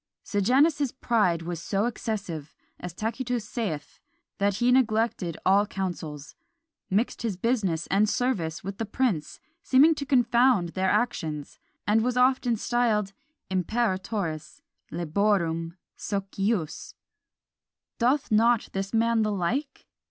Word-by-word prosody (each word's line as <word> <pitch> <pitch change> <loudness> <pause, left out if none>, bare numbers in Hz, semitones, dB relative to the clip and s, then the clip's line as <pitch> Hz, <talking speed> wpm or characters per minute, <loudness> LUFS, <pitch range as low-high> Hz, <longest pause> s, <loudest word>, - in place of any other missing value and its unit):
Sejanus's 265 - +2
pride 210 -10 +1
was 170 -1 -5
so 200 +4 0
excessive, 200 -10 -4 0.2
as 180 - -6
Tacitus 230 +4 -3
saith, 205 -11 -4 0.4
that 200 0 +2
he 240 +4 +2
neglected 220 -8 +1
all 200 +2 +4
councils, 165 -7 -5 0.6
mixed 210 +6 0
his 220 -6 -2
business 195 -7 0
and 205 +2 +3
service 195 -13 -1
with 195 +1 -6
the 225 - -1
prince, 205 - -1 0.2
seeming 290 +4 +5
to 295 - -5
confound 245 -6 +3
their 190 +2 0
actions, 160 -10 -1 0.3
and 215 +2 +3
was 250 +1 0
often 250 -1 +3
styled 220 -3 0 0.4
Imperatoris 185 -4 -2 0.3
laborum 170 0 0 0.2
socius. 195 -3 -3 1.0
Doth 255 +3 +1
not 230 +2 +3
this 195 +2 -3
man 230 0 +3
the 215 -1 +1
like? 245 - -2
210 Hz, 115 wpm, -26 LUFS, 180-240 Hz, 1.0 s, seeming